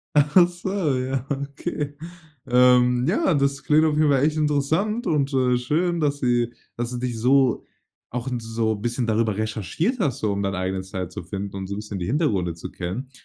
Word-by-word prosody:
Ach 150 +5 +6
so, 175 -3 -2
ja, 130 0 -2
okay. 140 +1 -4 0.5
Ähm, 125 +1 +4
ja, 220 - +2
das 140 -1 0
klingt 155 +1 +4
auf 150 -1 +1
jeden 155 -1 +4
Fall 135 0 +3
echt 155 +1 +2
interessant 160 - 0
und, 140 -3 +1
äh, 125 -1 +3
schön, 165 +7 0
dass 145 -2 0
sie 120 -2 +1 0.2
dass 120 +1 -3
du 125 - -4
dich 120 -2 -3
so 130 +1 +3 0.5
auch 125 +1 -4
'n 125 -2 -2
so 115 -1 -1
bisschen 120 +3 -2
darüber 110 -2 +1
recherchiert 110 - -2
hast, 140 - 0
so 105 -2 0
um 100 0 -2
dein 100 0 -1
eigenen 95 0 -2
Style 95 -2 -5
zu 90 - -7
finden 100 +3 -5
und 95 -1 -4
so 100 - -4
bisschen 105 -1 -6
die 90 - -3
Hintergründe 105 - 0
zu 85 - -8
kennen. 100 +10 -5
125 Hz, 195 wpm, -23 LUFS, 110-150 Hz, 0.5 s, Ach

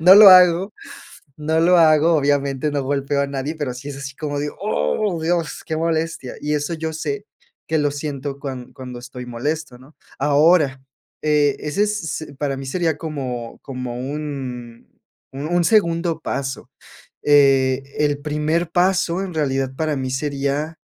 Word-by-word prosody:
No 180 +4 +9
lo 205 -1 +11
hago 180 +2 +6 0.6
no 155 +1 0
lo 175 +1 +5
hago, 160 +1 +5
obviamente 140 0 +1
no 145 -1 -1
golpeo 140 0 0
a 140 - 0
nadie, 140 +3 -3
pero 140 -5 -3
sí 130 +3 -8
es 140 - -6
así 140 -1 -7
como 145 -2 -3
digo: 145 0 -4
"¡Oh 165 - 0
Dios!, 165 -2 -1
qué 160 - -2
molestia". 165 -4 -2
Y 150 0 -1
eso 150 +3 -1
yo 160 0 -4
sé 420 - -4 0.4
que 160 0 +1
lo 145 -1 +1
siento 140 -1 -5
cuan 130 -3 -7
cuando 125 -2 -8
estoy 125 0 -9
molesto, 130 +2 -4
¿no? 135 +4 -18 0.2
Ahora, 145 -1 +3 0.4
eh, 150 -2 +3
ese 150 +7 -1
s 160 -8 -4
para 140 -2 -1
mí 135 0 -7
sería 165 +1 0
como 130 -7 -5
como 125 -2 -5
un 130 -4 -6 0.4
un 140 +2 -5
un 175 +2 +2
segundo 170 -4 +2
paso, 135 -3 -4 0.6
eh, 135 -2 +4 0.2
el 145 -1 +1
primer 155 +3 -1
paso 180 0 +2
en 185 - -6
realidad 135 -4 -1
para 155 +1 -1
mí 130 -1 -3
sería, 140 +3 -2
145 Hz, 160 wpm, -21 LUFS, 135-160 Hz, 0.6 s, lo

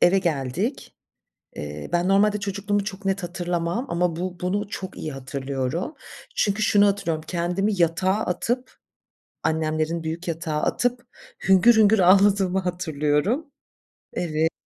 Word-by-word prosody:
Eve 185 +2 +5
geldik. 170 - -2 0.6
Eee, 75 0 -6
ben 175 +1 +2
normalde 205 +2 +3
çocukluğumu 200 0 -1
çok 200 -1 -7
net 195 0 0
hatırlamam 175 +4 -2
ama 170 -1 0
bu 180 0 -4
bunu 200 +3 -1
çok 190 -2 -6
iyi 155 - -4
hatırlıyorum. 135 - -3 0.4
Çünkü 205 +1 +1
şunu 205 -1 +5
hatırlıyorum 170 -6 -1
kendimi 180 +4 0
yatağa 175 +3 +2
atıp 245 +8 -2 0.7
annemlerin 160 +1 0
büyük 165 +3 -4
yatağa 160 -2 -2
atıp 245 0 0 0.4
hüngür 195 +5 +6
hüngür 220 -1 +5
ağladığımı 190 0 +5
hatırlıyorum. 175 - -1 0.6
Evet. 160 -1 0
180 Hz, 125 wpm, -24 LUFS, 160-200 Hz, 0.7 s, hüngür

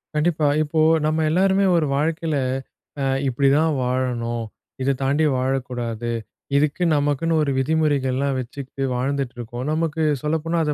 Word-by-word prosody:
கண்டிப்பா. 155 -1 +2 0.2
இப்போ, 155 +1 0 0.2
நம்ம 155 +1 +1
எல்லாருமே 190 +3 +3
ஒரு 160 - +2
வாழ்க்கையில 160 0 0 0.6
அ - - 0 0.2
இப்பிடிதான் 140 +5 +3
வாழணும், 125 -2 -1 0.4
இத 135 +1 +2
தாண்டி 140 +4 +2
வாழக்கூடாது. 125 -3 -2 0.5
இதுக்கு 150 +4 +1
நமக்குன்னு 145 +3 +1
ஒரு 140 - 0
விதிமுறைகள்லாம் 140 -2 +1
வச்சுக்கிட்டு 135 +2 -6
வாழ்ந்துட்டு 135 0 -2
இருக்கோம். 120 +2 -6
நமக்கு 160 0 0 0.2
சொல்லப்போனா 160 +2 -1
அத 150 -1 0
140 Hz, 125 wpm, -22 LUFS, 130-160 Hz, 0.6 s, எல்லாருமே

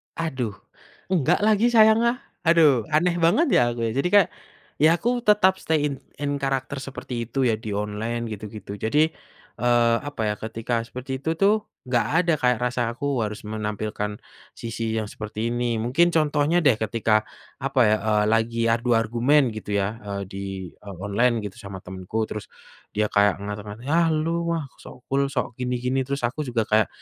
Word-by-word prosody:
Aduh, 130 -10 -3 0.6
enggak 175 +2 +2
lagi 215 +2 +4
sayang, 220 -2 +6
ah, 235 - +2 0.3
aduh 150 -9 +5
aneh 170 +3 +3
banget 175 - +4
ya - - +5
aku 120 - -5
jadi 135 +8 0
kayak, 200 -4 +6 0.5
ya 160 +2 +6
aku 240 +7 0
tetap 210 -4 +4
stay 155 -2 +1
in 135 - -6 0.2
in 145 -1 -2
character 135 0 -2
seperti 125 -3 -5
itu 135 +2 -1
ya 115 -3 +3
di 110 -3 -4
online 105 +3 -3
gitu 105 0 -6
gitu 100 -1 -8
jadi, 150 +10 +2 0.5
eee, 120 -1 +3
apa 145 -6 -5
ya - - -1
ketika 115 +2 -2
seperti 130 +1 -5
itu 160 +4 -1
tuh, 210 +4 +2 0.2
nggak 125 -2 +2
ada 170 0 +3
kayak 125 -2 +2
rasa 125 0 -1
aku 140 0 -1
harus 105 0 -5
menampilkan, 105 -1 -3 0.4
sisi 115 -1 -3
yang 110 - 0
seperti 110 +2 -4
ini 120 -1 0
mungkin 140 +9 +3
contohnya 155 +2 +2
deh 130 -7 +4
ketika, 110 -1 +1 0.3
apa 135 0 -1
ya, 105 0 +4
eee, 105 -1 +3
lagi 115 +1 +1
adu 120 +1 +2
argumen 120 +4 +3
gitu 105 -1 -4
ya, 100 +3 -1
eee, 100 -1 -5
di, 95 -2 -6
eee, 100 -2 -9
online 115 +3 +1
gitu 100 -2 -7
sama 95 -2 -9
temanku 95 +4 -3
terus, 105 - -6 0.5
dia 105 0 0
kayak 100 -1 +4
ngata-ngata, 105 +2 -7
"Ah, 165 +1 +4
elu, 160 +2 0 0.2
wah, 160 - -2 0.2
sok 125 - -13
cool, 140 0 +2
sok 130 -2 -3
gini-gini." 125 +1 -1
Terus 140 -2 -3
aku 120 +5 -1
juga 115 -2 0
kayak 110 0 +2
120 Hz, 175 wpm, -24 LUFS, 110-145 Hz, 0.6 s, sayang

